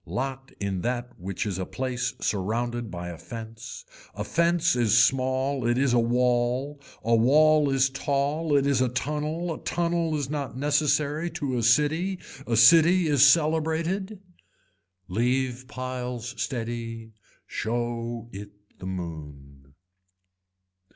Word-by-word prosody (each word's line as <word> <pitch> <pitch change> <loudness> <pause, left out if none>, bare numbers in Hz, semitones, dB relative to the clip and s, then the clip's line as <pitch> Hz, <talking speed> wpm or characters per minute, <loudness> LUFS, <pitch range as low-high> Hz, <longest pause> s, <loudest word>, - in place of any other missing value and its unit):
Lot 135 +1 -4
in 100 -3 -2
that 120 +2 -2
which 95 +4 -4
is 95 -3 -3
a 95 - -2
place 125 -1 -3
surrounded 115 +4 -2
by 90 -1 -6
a 85 -2 -8
fence. 115 0 -9 0.3
A 105 - -3
fence 170 +6 +2
is 115 -2 +3
small 130 +1 +2
it 120 +1 +2
is 135 -2 +2
a 120 - +4
wall, 125 +4 0 0.2
a 115 +1 +1
wall 150 +5 +4
is 135 0 +3
tall 145 +3 0
it 140 - +2
is 140 -2 +2
a 130 - +2
tunnel, 150 +6 -2
a - - -8
tunnel 170 -2 -1
is 145 -3 -2
not 140 -3 -4
necessary 150 +2 +1
to 140 -6 -3
a 120 - 0
city. 150 - +2 0.3
A 115 -1 +1
city 165 +9 +6
is 145 -2 +6
celebrated. 165 +6 +1 0.9
Leave 125 +4 -1
piles 125 -2 -5
steady, 115 -3 -4 0.3
show 120 0 -3
it 100 +1 -8 0.3
the 95 - -7
moon. 70 -6 -8
130 Hz, 130 wpm, -26 LUFS, 115-150 Hz, 0.9 s, city